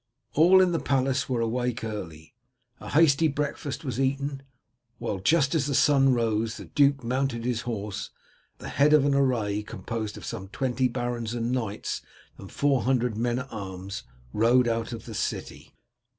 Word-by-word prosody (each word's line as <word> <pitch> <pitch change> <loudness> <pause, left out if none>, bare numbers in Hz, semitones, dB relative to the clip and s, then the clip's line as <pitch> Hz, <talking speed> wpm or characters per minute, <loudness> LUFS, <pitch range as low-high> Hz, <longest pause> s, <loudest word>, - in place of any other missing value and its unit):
All 180 +5 +6
in 185 -1 +3
the 165 - 0
palace 135 0 0
were 120 -3 0
awake 120 +1 -1
early. 90 -8 -6 0.5
A - - -8
hasty 160 0 +4
breakfast 145 0 -3
was 130 -2 -3
eaten, 135 +1 -1 0.6
while 115 -5 -3
just 140 - +3
as 150 -4 +1
the 140 - 0
sun 135 +1 +5
rose 115 -2 0
the - - -8
duke 140 -2 +2
mounted 125 -1 -1
his 120 -2 0
horse, 105 -3 -4 0.5
and - - -15
at - - -6
the - - -9
head 150 +2 +6
of 150 -2 +5
an 145 - +3
array, 120 -7 +1
composed 105 +2 -5
of - - -9
some 100 -4 -5
twenty 125 +3 0
barons 120 -2 -3
and 120 0 -1
knights 110 -5 -3 0.4
and 100 - -10
four 140 -3 +2
hundred 125 -3 +1
men 120 +2 0
at 130 0 -6
arms, 95 - -6 0.3
rode 120 +3 +4
out 115 0 -1
of 115 -2 -7
the - - -8
city. - - -4
125 Hz, 180 wpm, -27 LUFS, 115-135 Hz, 0.6 s, All